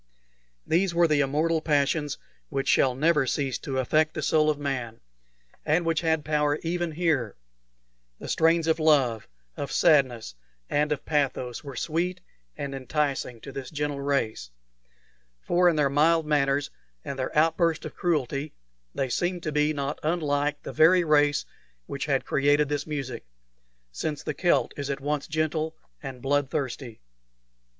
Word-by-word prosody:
These 175 +1 +1
were 170 0 +5
the 150 -2 +2
immortal 155 +4 +1
passions 145 -1 +1 0.3
which 135 -2 -2
shall 130 -2 +3
never 150 -1 +2
cease 135 -1 -1
to 135 -2 -4
affect 155 +5 +1
the 155 - -3
soul 155 0 +3
of 150 - +1
man, 130 -5 -4 0.6
and 160 +3 +1
which 165 -2 +1
had 160 -2 0
power 150 -1 +1
even 170 0 -2
here; 150 - 0 0.8
the - - -9
strains 165 0 +3
of 160 0 +1
love, 135 -8 +3 0.3
of 140 -2 -5
sadness, 130 - +3 0.4
and 150 +1 +1
of 150 - -2
pathos 135 -5 -1
were 140 -3 -8
sweet 175 +6 -2 0.4
and 140 -1 -4
enticing 135 -2 -2
to 140 - -9
this 135 -1 -6
gentle 145 -2 -3
race; 130 - -1 0.9
for 175 - +3
in 170 - +1
their 150 -2 +3
mild 155 +4 +3
manners 140 -2 +1 0.3
and 135 - -5
their 130 - -3
outburst 165 +1 +2
of - - -6
cruelty 150 -4 -1 0.4
they 135 - 0
seemed 175 +6 -1
to 155 - -2
be 150 0 +2
not 140 -1 -3
unlike 150 -3 0
the - - -6
very 175 +3 +5
race 145 -2 +3 0.4
which - - -5
had - - +1
created 145 +1 +2
this 145 0 -2
music, 135 -6 -4 0.7
since 145 - -4
the 150 - -3
Celt 175 +2 +1
is 140 -1 -4
at 140 -1 -2
once 145 0 -2
gentle 155 0 -1 0.3
and 130 -3 -8
blood 145 0 +1
thirsty. 130 -5 -4
150 Hz, 155 wpm, -26 LUFS, 135-160 Hz, 0.9 s, were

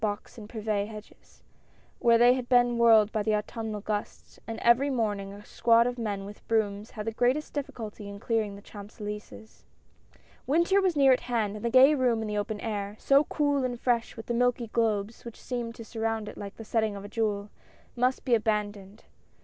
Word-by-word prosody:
Box 205 -2 -3
and 210 -1 -10
Privet 215 -3 -2
hedges, 215 -1 -13 0.6
where 235 -1 +5
they 240 +1 +6
had 255 -1 -4
been 245 -1 +4
whirled 220 -3 +6
by 215 - -1
the 215 0 +1
Autumnal 215 0 -4
gusts, 210 0 -5
and 225 -1 -5
every 240 +4 +4
morning 205 -6 -1
a 205 +1 -12
squad 230 0 +3
of 245 0 -2
men 205 -3 -3
with 205 +1 -12
brooms 210 -1 0
had 210 -1 -7
the 225 - -1
greatest 250 +6 0
difficulty 230 -8 -6
in 200 0 -8
clearing 215 -2 -1
the 200 - -13
Champs 205 0 -12
Elysees. 210 +1 -8 0.8
Winter 340 +7 +3
was 370 -4 +1
near 275 -2 +5
at 250 - +1
hand, 225 -4 -2
and 210 - -10
the 235 - +1
gay 260 +4 +7
room 245 -5 +1
in - - -4
the 210 - -3
open 205 +1 -3
air 205 -2 -3
— - - -30
so 280 +2 +6
cool 285 -2 0
and 245 -2 -2
fresh 235 -2 0
with 225 - -7
the 240 - -2
milky 245 -1 +1
globes 220 -2 0
which 235 -2 -10
seemed 240 -2 -4
to 230 - -9
surround 225 -1 -2
it - - -8
like 200 -1 -8
the 225 - -10
setting 220 -2 0
of 200 0 -8
a - - -6
jewel 210 -1 -2 0.2
— - - -29
must 250 +1 0
be 250 - +1
abandoned. 210 -2 -1
225 Hz, 210 wpm, -28 LUFS, 210-245 Hz, 0.8 s, gay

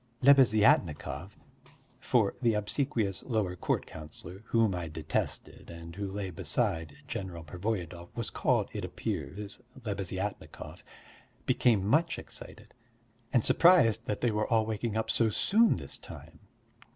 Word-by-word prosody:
Lebeziatnikov 105 - +4 0.7
(for 120 -6 +2
the 115 -3 +3
obsequious 105 -2 -1
lower 105 -7 -1
court - - -1
councillor 80 +4 -10
whom 115 -4 +2
I 90 -2 -3
detested 80 0 -4
and 85 0 -9
who 100 -1 -4
lay 100 -1 -4
beside 80 -2 -1
General 90 -4 -5
Pervoyedov 90 0 -4
was 115 -2 -3
called, - - +1
it - - -4
appears, 105 +1 -5 0.3
Lebeziatnikov) 100 -1 -4 0.6
became 110 -6 +3
much 155 +10 +2
excited, - - -9 0.6
and 120 - +3
surprised 170 - +5
that 105 - -2
they 120 - +2
were 105 0 0
all 110 -2 +3
waking 110 0 -2
up 110 - 0
so 115 -2 +3
soon 220 - +3
this - - -6
time. - - -12
105 Hz, 125 wpm, -30 LUFS, 90-115 Hz, 0.7 s, surprised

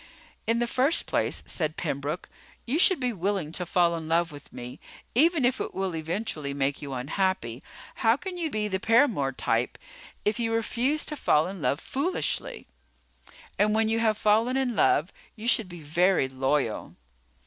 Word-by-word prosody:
"In 230 +1 +3
the 240 - +1
first 260 +7 +2
place," - - -1
said 155 -2 -2
Pembroke, 145 +1 -3 0.4
"you 275 +7 0
should 370 -2 +6
be 250 -2 -1
willing 190 -4 -1
to 180 +1 -4
fall 170 -1 +3
in 160 -1 -6
love 165 0 +1
with 145 -1 -12
me 125 0 -8 0.3
even 310 +2 +4
if 255 +1 +1
it - - -4
will 190 -3 -2
eventually 160 -3 -3
make 140 0 -1
you 140 -2 -6
unhappy. 130 - -1 0.4
How 230 +1 +3
can 370 +3 -6
you 335 -3 -2
be 215 -5 -1
the 190 -2 -2
paramour 225 - +3
type 125 - -1 0.5
if 210 +2 +1
you 225 -1 0
refuse 250 +6 0
to 300 - -3
fall 155 - +3
in 190 -1 -6
love 145 - +1
foolishly? 365 - -2 0.9
And 210 +1 +3
when 220 0 +2
you 225 0 +1
have 220 -2 +2
fallen 225 +5 +2
in 255 -3 0
love, 170 -3 +3 0.2
you 220 +1 -6
should 225 -5 +3
be 175 -2 -9
very 170 +1 +2
loyal." 130 -2 -1
195 Hz, 175 wpm, -27 LUFS, 155-240 Hz, 0.9 s, should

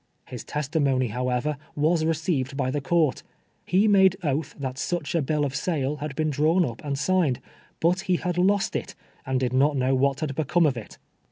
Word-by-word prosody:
His 125 -3 -8
testimony, 140 -4 0
however, 125 +5 -1 0.2
was 155 +2 +2
receiv 160 -4 0
ed 140 - -9
by 130 -2 0
the 145 +1 -2
court! 155 -2 +1 0.5
He 195 +4 +3
made 190 -2 +5
oath 145 -1 -1
that 130 -2 -5
such 175 -4 -2
a 165 - +2
bill 150 +1 0
of 135 -1 -4
sale 150 -4 -1
had 150 -1 -5
been 155 +1 0
drawn 160 +5 +3
up 115 -4 -6
and 140 -2 -2
signed, 160 -5 +1 0.4
Init 180 +3 +3
he 185 -1 +1
had 180 0 -2
lost 200 +3 +2
it, - - -4 0.3
and 130 -1 +1
did 125 -1 -1
not 140 +3 +3
hnoio 130 0 +2
what 140 +1 +1
had 155 -3 -1
hecome 160 +3 +2
of 135 - 0
it 115 -3 -9
150 Hz, 200 wpm, -25 LUFS, 130-170 Hz, 0.5 s, made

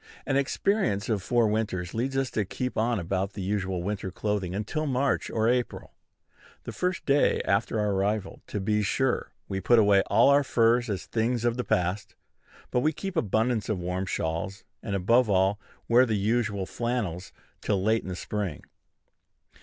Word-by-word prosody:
An 135 - 0
experience 140 - 0
of 105 -4 0
four 120 +3 +2
winters 105 -5 -2
leads 130 +4 -1
us 135 -2 0
to 110 - 0
keep 125 +6 -4
on 115 0 +1
about 95 +3 -2
the 100 - -6
usual 95 -2 -2
winter 100 0 -3
clothing 95 -1 -2
until 150 +10 -2
March 135 -1 0
or 110 0 0
April. 125 0 -1 0.7
The - - -6
first 180 0 -2
day 140 +1 +3
after 105 +2 +1
our 105 -1 +1
arrival, 100 +1 -1
to 105 - -3
be 105 +2 +1
sure, 130 +5 0 0.2
we 95 0 -3
put 120 +6 +4
away 100 -3 +5
all 115 +6 +5
our 140 +1 +5
furs 120 -1 +2
as 100 -3 -3
things 115 +1 -1
of 120 -1 +2
the 125 - -2
past; 90 +1 -1 0.6
but 125 - +2
we 155 +5 +2
keep 195 +4 -5
abundance 110 - 0
of 110 - 0
warm 90 +2 -3
shawls, 85 +4 -3 0.2
and, 100 -3 -3
above 115 +5 +3
all, 95 +1 +2 0.3
wear 125 +2 +5
the 110 -2 0
usual 105 -1 0
flannels 105 -7 -3 0.3
till 100 -2 0
late 110 +2 +2
in - - -8
the 90 - -3
spring. 100 -3 -4
110 Hz, 175 wpm, -27 LUFS, 95-120 Hz, 0.7 s, away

